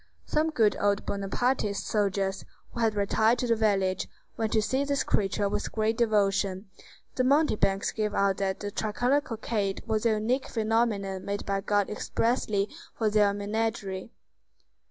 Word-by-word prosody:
Some 310 +1 +1
good 225 -9 +3
old 200 0 +1
Bonapartist 200 +1 -1
soldiers, 195 -2 0 0.3
who - - -7
had 225 -2 +2
retired 220 +3 +2
to 250 - -1
the 230 -1 +3
village, 195 -4 +1 0.3
went 220 -1 -1
to 220 - +4
see 265 +5 0
this 280 0 0
creature 200 0 +1
with 200 - -3
great 220 0 0
devotion. 200 -3 +1 0.5
The 255 - 0
mountebanks 255 -8 +2
gave 210 -1 -2
out 195 -1 +2
that 190 -1 -2
the 205 0 -4
tricolored 245 +8 0
cockade 215 -5 -2
was 220 0 +1
a 225 - +3
unique 235 +5 0
phenomenon 215 -4 0
made 200 0 -3
by 195 0 -1
God 205 0 +1
expressly 210 -2 0 0.3
for 220 -2 +1
their 205 -1 +4
menagerie. 205 -1 -3
210 Hz, 155 wpm, -28 LUFS, 200-230 Hz, 0.5 s, to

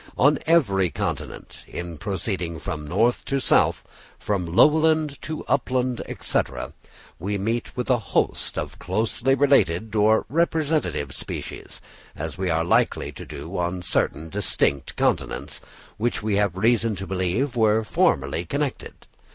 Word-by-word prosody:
On 145 +2 +4
every 100 - +3
continent, - - -5
in 85 -3 -6
proceeding 95 -3 -3
from 75 -2 -5
north 110 +9 +2
to 135 - 0
south, - - +3 0.3
from 100 -4 -2
lowland 155 - +3
to 155 0 -5
upland, 125 -2 0 0.2
&c., - - +1 0.8
we 100 +4 -2
meet 115 +6 -2
with 125 - -2
a 125 -3 +3
host 105 - -1
of - - -4
closely 115 +7 0
related 110 - +3
or 110 +1 +4
representative 155 - 0
species; - - -6 0.3
as - - -5
we 95 -2 -1
likewise 80 +1 +1
do - - -8
on 90 +1 -2
certain 80 -2 -1
distinct 85 -7 0
continents, - - -1 0.4
which 120 0 -1
we 105 -2 +1
have 100 -3 +1
reason 115 +1 +2
to 95 +1 -5
believe 95 +9 -1
were 110 -1 +3
formerly 70 -5 +1
connected. 140 - -4
105 Hz, 130 wpm, -24 LUFS, 90-130 Hz, 0.8 s, On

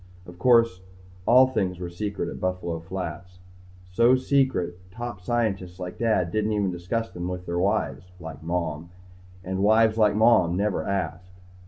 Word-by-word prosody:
Of 90 0 -13
course, 115 -5 +4 0.5
all 130 +2 +7
things 95 -8 -1
were 90 -1 -6
secret 100 +3 -3
at - - -6
Buffalo 90 -2 -2
Flats. 90 +1 -7 0.5
So 115 +7 +5
secret 130 -10 0
top 120 -1 -7
scientists 95 -5 -2
like 90 -1 -7
Dad 110 -7 +1
didn't 110 +2 0
even 100 -3 0
discuss 95 +6 -3
them 90 0 -5
with 90 0 -5
wives 90 +2 -1
like 80 -3 -9
Mom. 85 -1 -3 0.5
And 95 +1 -3
wives 110 +2 +4
like 105 -1 +4
Mom 105 -6 +4
never 105 0 -1
asked. 90 -1 -4
95 Hz, 150 wpm, -25 LUFS, 90-110 Hz, 0.5 s, all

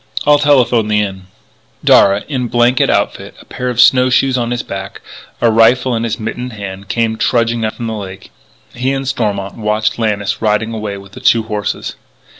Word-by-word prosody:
I'll 145 0 +5
telephone 125 -6 +3
the 105 0 +2
Inn." 95 -2 -4 0.6
Darragh, 100 +1 +5
in 130 -4 -2
blanket 120 +2 +2
outfit, - - -1
a - - -15
pair 125 0 -4
of 125 -1 -4
snow 130 0 +5
shoes 130 0 +2
on 120 -2 -1
his 120 0 -2
back, 95 0 -7 0.4
a 115 - +3
rifle 120 +3 +3
in 115 +1 -1
his 115 +1 -3
mittened 125 +3 -5
hand, 100 -2 -8
came 115 0 0
trudging 115 -1 0
up 110 - -2
from 120 - -6
the 110 - -3
lake. 95 -3 -8 0.4
He 130 +3 -1
and 135 -1 -3
Stormont 100 -6 -2
watched 110 +1 -1
Lannis 105 -3 -1
riding 110 +1 0
away 105 -2 -4
with 100 0 -13
the - - -11
two 115 -1 +3
horses. 105 -2 -4
115 Hz, 190 wpm, -15 LUFS, 105-125 Hz, 0.6 s, I'll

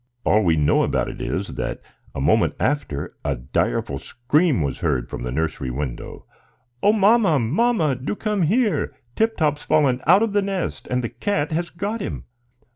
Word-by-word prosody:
All 105 - +3
we 85 -3 +3
know 75 -2 +3
about - - 0
it - - -8
is, - - -2
that - - -3 0.4
a - - -3
moment - - +2
after 130 - -2
a 70 -1 0
direful 65 +2 -1
scream 130 - +1
was 70 -3 -3
heard 60 - 0
from - - -7
the 60 - -3
nursery 75 -1 -2
window. 65 -1 -5 0.6
"O 205 - +5
mamma, 210 -5 +4
mamma, 155 - +1
do 135 +10 -3
come 210 -2 -1
here! 215 +6 +1 0.2
Tip 225 0 +1
Top's 150 -3 +1
fallen 140 -5 +2
out 185 +6 +6
of 225 -3 -1
the 205 - +3
nest, 195 -3 -3
and 125 0 0
the 115 - -2
cat 145 - -2
has 170 +2 -1
got 205 +6 -4
him!" - - -5
150 Hz, 180 wpm, -22 LUFS, -, 0.6 s, out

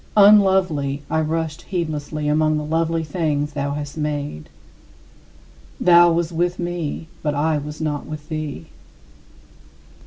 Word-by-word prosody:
Unlovely, 190 -9 +4
I 160 - +2
rushed 160 0 -2
heedlessly 155 -4 -3
among 155 +1 +2
the 150 - -2
lovely 165 +1 0
things 150 -2 -1
thou 140 -1 -2
hast 145 +1 -6
made. 145 - -3 1.3
Thou 175 -1 +6
wast 170 0 0
with 175 +2 0
me, 170 -2 -4
but 150 -2 -1
I 150 +1 +1
was 150 +1 -7
not 150 -2 -3
with 155 -1 -8
thee. 155 0 -5
155 Hz, 125 wpm, -21 LUFS, 150-170 Hz, 1.3 s, Thou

